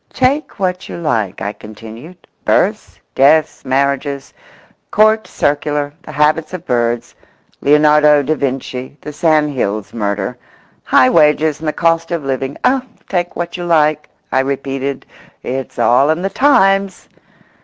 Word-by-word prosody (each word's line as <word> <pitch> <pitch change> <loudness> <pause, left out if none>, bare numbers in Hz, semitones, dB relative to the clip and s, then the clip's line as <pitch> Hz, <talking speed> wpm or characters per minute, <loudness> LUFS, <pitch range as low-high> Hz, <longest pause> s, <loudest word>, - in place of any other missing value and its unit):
"Take 270 +4 0
what 185 -2 -2
you - - -6
like," 110 - -2
I 100 +1 -3
continued, 115 +12 -12 0.2
"births, - - 0
deaths, 155 +3 +3
marriages, 140 +1 -1 0.6
Court 215 +1 +3
Circular, 145 0 -1
the - - -10
habits 155 +3 +1
of 180 -1 -9
birds, 120 -3 -1 0.5
Leonardo 150 0 +4
da 150 +3 0
Vinci, 130 -1 -4
the 150 - -8
Sandhills 145 - 0
murder, 105 +2 -3 0.4
high 130 - +4
wages 155 -1 +3
and 160 - -6
the 155 - 0
cost 165 0 +1
of 170 -3 -3
living—oh, 135 - -1 0.3
take 175 -2 -2
what 175 +1 -4
you 175 - -5
like," 155 -3 +2 0.2
I 130 - +2
repeated, 135 0 -3 0.4
"it's 130 0 -5
all 135 +4 +3
in 160 +3 0
the 195 - -1
Times!" 195 -7 +2
150 Hz, 135 wpm, -16 LUFS, 130-165 Hz, 0.6 s, Leonardo